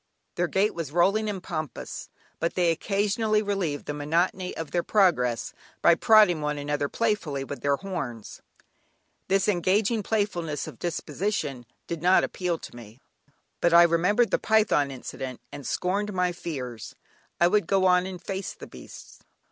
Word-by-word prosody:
Their 175 Hz, -, 0 dB
gait 195 Hz, +5 st, +1 dB
was 165 Hz, -5 st, -5 dB
rolling 200 Hz, +6 st, +2 dB
and 195 Hz, -3 st, -5 dB
pompous, 155 Hz, -6 st, -5 dB, 0.3 s
but 170 Hz, -, -1 dB
they 175 Hz, -2 st, +3 dB
occasionally 210 Hz, +4 st, 0 dB
relieved 190 Hz, -8 st, -2 dB
the 150 Hz, -, -3 dB
monotony 170 Hz, +5 st, -1 dB
of 160 Hz, -3 st, -5 dB
their 175 Hz, -, +1 dB
progress 165 Hz, -, +2 dB, 0.3 s
by 170 Hz, -, +7 dB
prodding 180 Hz, -3 st, +5 dB
one 150 Hz, 0 st, -1 dB
another 145 Hz, 0 st, -2 dB
playfully 205 Hz, -12 st, -1 dB
with 140 Hz, +1 st, -7 dB
their 140 Hz, 0 st, +2 dB
horns. 135 Hz, -, -6 dB, 0.9 s
This 195 Hz, 0 st, +2 dB
engaging 205 Hz, +4 st, +2 dB
playfulness 190 Hz, -8 st, -1 dB
of -, -, -10 dB
disposition 155 Hz, -, -3 dB, 0.2 s
did 170 Hz, -2 st, -5 dB
not 180 Hz, +2 st, +5 dB
appeal 180 Hz, -2 st, -2 dB
to -, -, -11 dB
me. 115 Hz, 0 st, -12 dB, 0.6 s
But 170 Hz, 0 st, +4 dB
I 170 Hz, -, +9 dB
remembered 180 Hz, +8 st, +3 dB
the -, -, +2 dB
python 215 Hz, -10 st, +2 dB
incident, 130 Hz, -1 st, -7 dB
and 140 Hz, -, -8 dB
scorned 200 Hz, +3 st, -1 dB
my 180 Hz, -1 st, +1 dB
fears, 130 Hz, -10 st, -6 dB, 0.4 s
I 170 Hz, -, +5 dB
would 205 Hz, +3 st, +2 dB
go 195 Hz, -1 st, +2 dB
on 180 Hz, 0 st, +4 dB
and 185 Hz, -1 st, -7 dB
face 190 Hz, +2 st, -5 dB
the -, -, -10 dB
beasts. -, -, -13 dB
175 Hz, 155 wpm, -26 LUFS, 150-195 Hz, 0.9 s, I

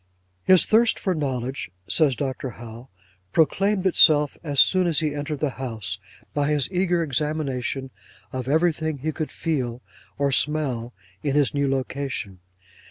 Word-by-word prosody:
'His 185 Hz, -, +5 dB
thirst 225 Hz, +1 st, +4 dB
for 190 Hz, -, -1 dB
knowledge,' 135 Hz, -, -3 dB, 0.2 s
says 150 Hz, -5 st, +3 dB
Dr. 130 Hz, +2 st, -3 dB
Howe, 120 Hz, +2 st, -10 dB, 0.4 s
'proclaimed 195 Hz, -, +2 dB
itself 150 Hz, -5 st, +5 dB
as 145 Hz, -4 st, -1 dB
soon 185 Hz, +3 st, +5 dB
as 165 Hz, -3 st, +2 dB
he 155 Hz, -3 st, -1 dB
entered 145 Hz, 0 st, -4 dB
the 150 Hz, -3 st, +1 dB
house, 110 Hz, -6 st, -3 dB, 0.3 s
by 145 Hz, 0 st, 0 dB
his 150 Hz, -3 st, +2 dB
eager 180 Hz, -2 st, +1 dB
examination 135 Hz, -2 st, -2 dB, 0.4 s
of 130 Hz, -1 st, -4 dB
everything 160 Hz, 0 st, +1 dB
he 155 Hz, +4 st, -2 dB
could 155 Hz, 0 st, -4 dB
feel 130 Hz, -7 st, -3 dB, 0.3 s
or 140 Hz, 0 st, +1 dB
smell 135 Hz, -5 st, 0 dB, 0.3 s
in 140 Hz, -1 st, -1 dB
his 145 Hz, -3 st, +3 dB
new 140 Hz, -1 st, +1 dB
location. 135 Hz, -7 st, -3 dB
145 Hz, 145 wpm, -24 LUFS, 130-160 Hz, 0.4 s, His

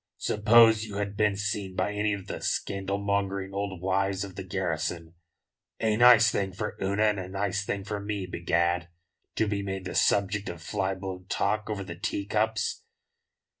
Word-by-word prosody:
"Suppose 110 Hz, +1 st, +5 dB
you 105 Hz, -3 st, -7 dB
had 100 Hz, 0 st, -3 dB
been 105 Hz, -1 st, +2 dB
seen 100 Hz, -2 st, -3 dB
by 105 Hz, -, 0 dB
any 105 Hz, +1 st, 0 dB
of 100 Hz, -2 st, -5 dB
the -, -, -5 dB
scandalmongering 100 Hz, 0 st, -1 dB
old 100 Hz, -3 st, -4 dB
wives 95 Hz, 0 st, +1 dB
of 100 Hz, -2 st, -7 dB
the 95 Hz, -, -5 dB
garrison? 85 Hz, -3 st, -3 dB, 0.7 s
A 110 Hz, -1 st, +2 dB
nice 120 Hz, -1 st, +7 dB
thing 95 Hz, -1 st, -1 dB
for 95 Hz, -, -4 dB
Una 100 Hz, +2 st, +1 dB
and 105 Hz, -2 st, +2 dB
a 90 Hz, -, -5 dB
nice 100 Hz, +1 st, -1 dB
thing 100 Hz, -1 st, -3 dB
for 105 Hz, +1 st, -4 dB
me, 100 Hz, -1 st, -3 dB
begad, 85 Hz, 0 st, 0 dB, 0.5 s
to 110 Hz, -, +1 dB
be 100 Hz, -1 st, -1 dB
made 95 Hz, -1 st, -4 dB
the 90 Hz, -, -4 dB
subject 100 Hz, +1 st, +2 dB
of 85 Hz, -, -7 dB
fly 95 Hz, +2 st, -2 dB
blown 95 Hz, -1 st, -7 dB
talk 105 Hz, +2 st, 0 dB
over 105 Hz, -2 st, -3 dB
the 90 Hz, -2 st, -7 dB
tea 100 Hz, +3 st, -3 dB
cups." 110 Hz, +1 st, 0 dB
100 Hz, 175 wpm, -28 LUFS, 95-105 Hz, 0.7 s, nice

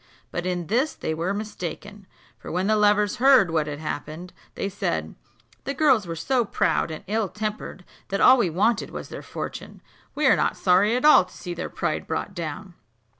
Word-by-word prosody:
But 175 Hz, +1 st, -3 dB
in 175 Hz, -1 st, -2 dB
this 250 Hz, -, 0 dB
they 160 Hz, -, -3 dB
were 165 Hz, +4 st, -2 dB
mistaken; 205 Hz, -1 st, -6 dB, 0.3 s
for -, -, -8 dB
when 180 Hz, +2 st, -1 dB
the 215 Hz, +1 st, +3 dB
lovers 210 Hz, +1 st, +3 dB
heard 255 Hz, -8 st, +5 dB
what 155 Hz, -2 st, 0 dB
had 145 Hz, -1 st, -4 dB
happened, 155 Hz, +3 st, -6 dB, 0.2 s
they -, -, -2 dB
said, 200 Hz, 0 st, -3 dB, 0.5 s
"The 275 Hz, -, -3 dB
girls 265 Hz, -, +3 dB
were 165 Hz, -, -4 dB
so 250 Hz, +9 st, +1 dB
proud 200 Hz, -, 0 dB
and 155 Hz, -, -7 dB
ill 210 Hz, 0 st, -1 dB
tempered, 210 Hz, -3 st, -5 dB, 0.2 s
that 195 Hz, -, -2 dB
all 260 Hz, 0 st, +7 dB
we 190 Hz, -, +2 dB
wanted 205 Hz, +7 st, +1 dB
was -, -, -8 dB
their -, -, -7 dB
fortune; -, -, -7 dB, 0.4 s
we 300 Hz, -, 0 dB
are 265 Hz, -, +6 dB
not -, -, 0 dB
sorry 195 Hz, +5 st, +3 dB
at 255 Hz, -, 0 dB
all 300 Hz, -11 st, +7 dB
to 180 Hz, -, -16 dB
see 175 Hz, -, -6 dB
their 170 Hz, -, -5 dB
pride -, -, -3 dB
brought 195 Hz, -, -3 dB
down. 170 Hz, +2 st, -6 dB
200 Hz, 195 wpm, -24 LUFS, 175-220 Hz, 0.5 s, all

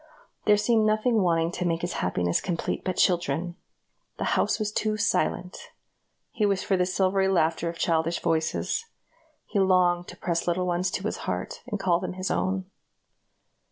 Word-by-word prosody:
There 210 Hz, 0 st, +5 dB
seemed 215 Hz, +1 st, +3 dB
nothing 215 Hz, +1 st, +2 dB
wanting 165 Hz, -2 st, +2 dB
to 180 Hz, -, -3 dB
make 170 Hz, -1 st, 0 dB
his 175 Hz, -, -2 dB
happiness 90 Hz, -1 st, 0 dB
complete 175 Hz, -3 st, -2 dB
but 185 Hz, -2 st, -2 dB
children. 175 Hz, -1 st, +1 dB, 0.6 s
The -, -, -3 dB
house -, -, +2 dB
was 210 Hz, -1 st, -2 dB
too 215 Hz, 0 st, -1 dB
silent; 185 Hz, -3 st, -1 dB, 0.6 s
he 220 Hz, -, -2 dB
wished 200 Hz, -2 st, +1 dB
for 195 Hz, -, +2 dB
the 180 Hz, -1 st, +1 dB
silvery 190 Hz, +1 st, +2 dB
laughter 170 Hz, -2 st, +1 dB
of 165 Hz, -, -7 dB
childish 165 Hz, 0 st, +1 dB
voices; 165 Hz, -, -1 dB, 0.6 s
he 205 Hz, -, -1 dB
longed 180 Hz, -2 st, +3 dB
to -, -, -10 dB
press 170 Hz, -1 st, -2 dB
little 180 Hz, +1 st, +1 dB
ones 180 Hz, +1 st, 0 dB
to 190 Hz, -, -4 dB
his 215 Hz, -, -2 dB
heart, -, -, -4 dB
and 210 Hz, -5 st, -3 dB
call 180 Hz, -3 st, +2 dB
them 185 Hz, -, -4 dB
his 185 Hz, +1 st, -3 dB
own. 190 Hz, 0 st, -1 dB
180 Hz, 170 wpm, -26 LUFS, 170-195 Hz, 0.6 s, There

